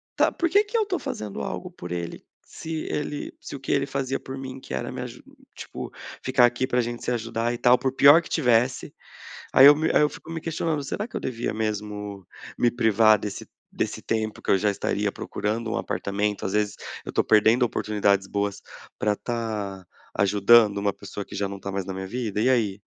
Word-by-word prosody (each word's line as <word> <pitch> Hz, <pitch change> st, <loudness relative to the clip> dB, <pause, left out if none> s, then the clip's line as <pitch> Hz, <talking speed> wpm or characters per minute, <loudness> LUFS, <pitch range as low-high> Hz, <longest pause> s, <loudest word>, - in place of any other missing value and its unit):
tá, -, -, +4 dB
por 340 Hz, -, -1 dB
que 405 Hz, +5 st, +5 dB
que 435 Hz, +3 st, -2 dB
eu 445 Hz, -, +3 dB
estou 385 Hz, -3 st, -2 dB
fazendo 105 Hz, -9 st, -5 dB
algo -, -, -5 dB
por 90 Hz, -, -9 dB
ele, 85 Hz, -1 st, -5 dB, 0.2 s
se 160 Hz, -1 st, -6 dB
ele 150 Hz, 0 st, -3 dB
se -, -, -8 dB
o -, -, -7 dB
que 130 Hz, -, -3 dB
ele 140 Hz, -1 st, +2 dB
fazia 135 Hz, -1 st, -2 dB
por 135 Hz, 0 st, -8 dB
mim 130 Hz, 0 st, -7 dB
que 100 Hz, -, -9 dB
era 65 Hz, -, -3 dB
me -, -, -5 dB
aju -, -, -8 dB, 0.3 s
tipo, -, -, -7 dB, 0.3 s
ficar 130 Hz, -1 st, +4 dB
aqui 120 Hz, +2 st, 0 dB
pra 125 Hz, 0 st, +2 dB
gente 120 Hz, 0 st, -4 dB
se -, -, -1 dB
ajudar 115 Hz, 0 st, -1 dB
e -, -, -4 dB
tal 125 Hz, +1 st, +5 dB
por 130 Hz, -1 st, -1 dB
pior 145 Hz, +5 st, +8 dB
que -, -, -12 dB
tivesse". 125 Hz, -2 st, +1 dB, 0.6 s
Aí 135 Hz, -, +9 dB
eu 145 Hz, -, +10 dB
me 155 Hz, +2 st, 0 dB
aí -, -, +4 dB
eu 150 Hz, -, +4 dB
fico 165 Hz, -, -12 dB
me 165 Hz, 0 st, -4 dB
questionando, 160 Hz, -2 st, -2 dB
será 210 Hz, +10 st, -3 dB
que -, -, -8 dB
eu -, -, -2 dB
devia 120 Hz, -2 st, -3 dB
mesmo 105 Hz, -2 st, -4 dB, 0.3 s
me 120 Hz, -, +3 dB
privar 110 Hz, -2 st, +4 dB
desse 100 Hz, 0 st, -6 dB, 0.3 s
desse -, -, -2 dB
tempo 110 Hz, -1 st, -2 dB
que -, -, 0 dB
eu -, -, +6 dB
já 105 Hz, +2 st, +1 dB
estaria 100 Hz, -, -1 dB
procurando 110 Hz, +2 st, -3 dB
um -, -, 0 dB
apartamento, 100 Hz, +2 st, -2 dB
às 95 Hz, -, -3 dB
vezes, 105 Hz, -1 st, 0 dB, 0.3 s
eu -, -, -9 dB
estou -, -, +1 dB
perdendo 110 Hz, +3 st, +5 dB
oportunidades 100 Hz, -4 st, +1 dB
boas 100 Hz, 0 st, -2 dB, 0.4 s
pra 105 Hz, 0 st, +1 dB
tá 105 Hz, -5 st, -4 dB, 0.3 s
ajudando 105 Hz, +2 st, +5 dB
uma 100 Hz, 0 st, 0 dB
pessoa 100 Hz, +1 st, -7 dB
que -, -, -12 dB
já 100 Hz, -, -1 dB
não 100 Hz, 0 st, -7 dB
tá 100 Hz, 0 st, -6 dB
mais 95 Hz, 0 st, -2 dB
na 95 Hz, -, -5 dB
minha 95 Hz, 0 st, -5 dB
vida, 110 Hz, -1 st, -3 dB
e 120 Hz, -, +3 dB
aí? 105 Hz, -6 st, +1 dB
115 Hz, 215 wpm, -25 LUFS, 100-130 Hz, 0.6 s, eu